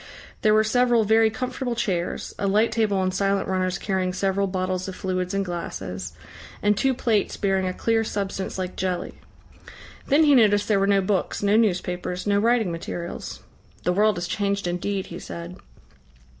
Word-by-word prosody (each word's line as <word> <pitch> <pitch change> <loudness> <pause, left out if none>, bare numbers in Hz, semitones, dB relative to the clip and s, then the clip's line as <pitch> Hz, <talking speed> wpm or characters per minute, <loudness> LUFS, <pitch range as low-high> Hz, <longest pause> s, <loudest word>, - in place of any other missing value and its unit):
There 215 0 +4
were 215 - +5
several 240 +1 +3
very 220 +1 +4
comfortable 250 +2 -3
chairs, 190 -7 -2
a 200 - 0
light 215 +4 +3
table 215 -3 +1
on 185 -1 +1
silent 195 +1 0
runners 185 -1 0
carrying 185 -2 -1
several 195 +1 0
bottles 185 0 -2
of 190 - -6
fluids 185 0 -2
and 195 0 0
glasses, 95 - -5 0.5
and 205 0 +4
two 265 +5 +1
plates 220 -4 0
bearing 190 -2 +1
a - - 0
clear 225 -1 +1
substance 195 -3 -3
like 185 -1 -4
jelly. 180 -1 -2 0.9
Then 290 +3 +5
he 295 -2 +5
noticed 205 -5 +4
there 210 -3 +3
were 195 - +2
no 200 -1 +4
books, 190 +1 -1
no 205 +1 +3
newspapers, 180 -4 0
no 200 -1 +2
writing 225 -3 +2
materials. 170 +1 -6 0.4
"The 180 - +1
world 210 +1 +3
has 175 0 -3
changed 200 0 -1
indeed," 185 +2 -2
he 175 - -6
said. 170 +2 -8
195 Hz, 170 wpm, -24 LUFS, 185-215 Hz, 0.9 s, were